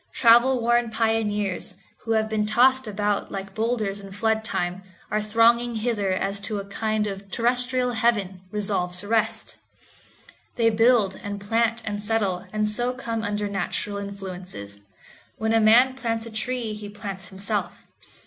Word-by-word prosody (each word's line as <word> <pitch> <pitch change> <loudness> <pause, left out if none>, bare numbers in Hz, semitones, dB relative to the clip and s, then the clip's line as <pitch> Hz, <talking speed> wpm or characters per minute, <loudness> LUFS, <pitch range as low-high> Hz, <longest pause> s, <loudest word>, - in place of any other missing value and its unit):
Travel 240 +2 +5
worn 240 0 +2
pioneers, 220 -4 -1 0.2
who 225 - -2
have 220 0 +2
been 215 -1 0
tossed 255 +4 +4
about 205 0 -1
like 195 0 -6
boulders 220 -2 -1
in 195 -1 -10
flood 220 +2 0
time, 180 -3 -2 0.3
are 215 +1 +1
thronging 230 +2 +3
hither 215 -3 0
as 195 +2 -1
to 205 +1 -3
a 200 - -4
kind 215 +1 -1
of 195 -2 -4
a - - -19
terrestrial 250 +4 +1
heaven, 210 -5 0
resolved 195 -3 -1
to 200 - -9
rest. 220 0 0 1.0
They 230 -1 +3
build, 225 -3 +3
and 205 0 -4
plant, 230 +2 0
and 205 -1 -3
settle, 205 -4 -1
and 215 0 0
so 240 +4 -1
come 230 -3 -3
under 210 -1 -2
natural 200 +1 -3
influences. 185 - -7 0.6
When 220 +1 0
a 225 - +5
man 235 +4 +6
plants 230 -3 -2
a 230 - -8
tree 225 0 -2
he 210 -1 -7
plants 200 -2 -5
himself. 200 +2 -4
215 Hz, 160 wpm, -24 LUFS, 200-230 Hz, 1.0 s, man